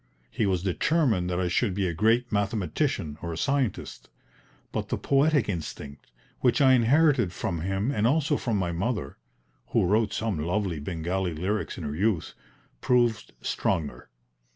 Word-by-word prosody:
He 105 - 0
was 90 -2 0
determined 105 - +1
that 90 0 -1
I 90 - 0
should 95 +2 0
be 100 -1 0
a 85 - -2
great 115 +7 +2
mathematician 95 -7 -1
or 85 - -4
a 80 - -5
scientist, 140 +1 -2 0.6
but - - -3
the - - -1
poetic 140 -3 +2
instinct, 75 -6 -6 0.3
which 125 +1 +2
I 135 -2 +6
inherited 130 - +4
from 85 -1 -3
him 95 - -1
and 110 -5 +1
also 145 +2 +2
from 115 -6 -1
my 90 -3 -1
mother 90 - -3 0.5
(who - - +2
wrote 105 +3 +2
some 110 -7 -2
lovely 90 +1 -1
Bengali 85 +3 -2
lyrics 100 +6 -2
in 90 - -6
her 75 -1 -4
youth) 100 -1 0 0.5
proved 120 -3 +1
stronger. 75 -3 -2
100 Hz, 155 wpm, -27 LUFS, 85-120 Hz, 0.6 s, I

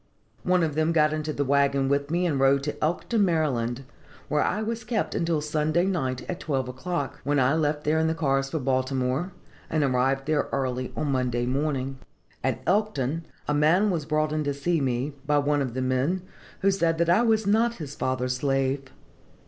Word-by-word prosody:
One 180 -1 +2
of 155 -2 0
them 155 +2 +1
got 155 -1 +3
into 155 0 -2
the 145 -1 -1
wagon 140 0 +2
with 140 +1 0
me, 175 +2 +1
and 150 -6 0
rode 135 +1 +4
to 150 - -4
Elkton, 175 +8 0
Md., 135 -8 0 0.5
where 150 - +2
I 215 +3 0
was 230 +1 -3
kept 220 -1 -1
until 165 -2 0
Sunday 155 +3 +1
night 130 -10 -2
at 180 - -4
twelve 135 -7 -1
o'clock, 140 +3 -4
when 145 0 +1
I 130 +2 +3
left 150 -1 0
there 155 +1 +2
in 160 - +2
the 160 - 0
cars 135 -4 0
for 160 - -2
Baltimore, 130 +4 0 0.4
and 155 -2 +1
arrived 135 +1 +1
there 155 0 0
early 130 -2 -2
on 145 - -1
Monday 125 -2 0
morning. 135 0 -1 0.4
"At - - -1
Elkton 165 -6 0 0.2
a 150 - +1
man 165 +8 +3
was 160 -5 -2
brought 155 -1 +1
in 155 0 0
to 145 -1 -1
see 160 +3 0
me, 130 +2 -1
by 150 0 +3
one 145 0 +2
of 130 -3 -3
the 130 - -1
men, 130 +8 0 0.4
who 195 +1 +4
said 165 -4 +1
that 170 0 +1
I 205 - +5
was 220 -2 +2
not 225 +3 +2
his 150 -7 -7
father's 130 0 -1
slave. 135 0 0
150 Hz, 195 wpm, -26 LUFS, 135-165 Hz, 0.5 s, I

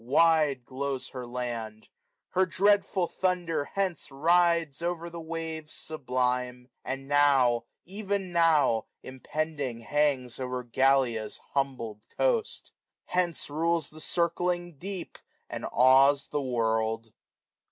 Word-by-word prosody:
Wide 145 -1 +3
glows 135 0 -4
her 125 -2 -7
land: 115 -3 -5 0.4
her 185 0 +2
dreadful 195 0 +2
thunder 175 -4 -1
hence 190 -5 -1
Rides 165 +1 +2
o'er 170 0 -3
the 170 0 -7
waves 160 -1 -5
sublime 125 -4 -2
j 125 - -35
and 135 +1 -5
now, 135 -5 +4 0.2
even 200 -1 -3
now. 160 -9 +3 0.2
Impending 135 -1 -4
hangs 135 -2 0
o'er 125 -1 -3
Gallia's 125 -3 +1
bundled 125 -6 -2 0.2
coast; 480 -3 0 0.4
430 180 - +3
Hence 170 -4 -2
rules 165 +1 0
the 155 - -10
drcling 175 -1 0
deep, 190 -1 -6 0.3
zod - - -4
awes 135 +3 +5
the 145 - -1
world. 110 -3 -1
145 Hz, 115 wpm, -28 LUFS, 125-170 Hz, 0.4 s, awes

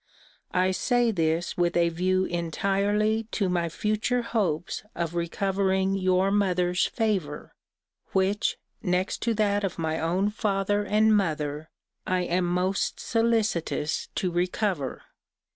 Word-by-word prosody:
I 185 +1 +2
say 240 +4 +2
this 165 -2 0
with 175 0 +1
a 170 0 +4
view 185 +3 +1
entirely 200 +6 0
to 195 -4 +1
my 170 -2 0
future 215 +7 0
hopes 180 -9 -1
of 170 -1 -2
recovering 190 +2 0
your 185 0 +2
mother's 180 -3 +2
favour, 190 -10 -2 0.6
which, 195 +2 +1 0.2
next 180 -1 -1
to 230 -1 0
that 205 -1 +1
of 195 - -2
my 160 -1 -1
own 185 +5 +1
father 205 -1 0
and 215 +1 +3
mother, 155 -5 -1 0.4
I 185 0 +1
am 180 +1 0
most 180 +2 0
solicitous 220 -9 0
to 185 - 0
recover. 180 - -1
185 Hz, 125 wpm, -26 LUFS, 175-205 Hz, 0.6 s, a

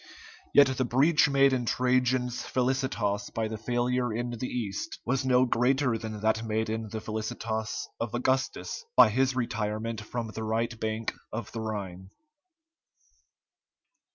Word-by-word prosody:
Yet 145 - +8
the 130 -1 0
breach 145 +5 +4
made 140 -1 +4
in 125 -2 -1
Trajan's 125 0 +1
felicitas 125 -6 -1
by 115 -1 -2
the 110 - -4
failure 125 +1 0
in 120 +2 -2
the 120 +2 -4
East 115 - -4
was 130 +2 0
no 130 -1 +4
greater 125 +1 +2
than 110 -1 -5
that 110 +1 +1
made 110 0 -1
in 110 -1 -3
the 110 - -4
felicitas 110 0 -3
of 115 0 -3
Augustus 130 - -1
by - - +8
his 130 +3 +2
retirement 110 -2 -2
from 115 +1 -4
the 110 - -6
right 115 +1 -1
bank 110 0 -2 0.2
of 115 +2 -5
the 115 - -4
Rhine. 95 -4 -5
115 Hz, 145 wpm, -28 LUFS, 110-130 Hz, 0.2 s, Yet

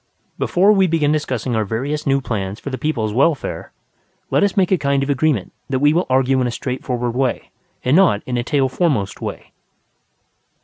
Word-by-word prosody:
Before 190 +4 +3
we 195 -3 +4
begin 155 -3 +1
discussing 130 -6 -1
our 110 - +1
various 140 +9 -3
new 135 0 +2
plans 100 -4 -4
for 140 - -6
the 130 - -3
people's 115 -9 -1
welfare, 140 +4 0 0.6
let - - +3
us 200 +1 0
make 190 -1 +2
a 190 - +4
kind 140 -1 +1
of 140 - -1
agreement 140 -7 0 0.2
that 135 - 0
we 145 +3 +3
will 175 +3 +1
argue 130 0 +2
in 125 - +1
a - - -1
straightforward 125 -1 -3
way, 130 -2 -1 0.3
and 130 +4 +3
not 175 - +3
in 125 - -3
a 120 - 0
tail 135 +2 +1
foremost 130 - -1
way. - - -6
135 Hz, 190 wpm, -19 LUFS, 120-155 Hz, 0.6 s, we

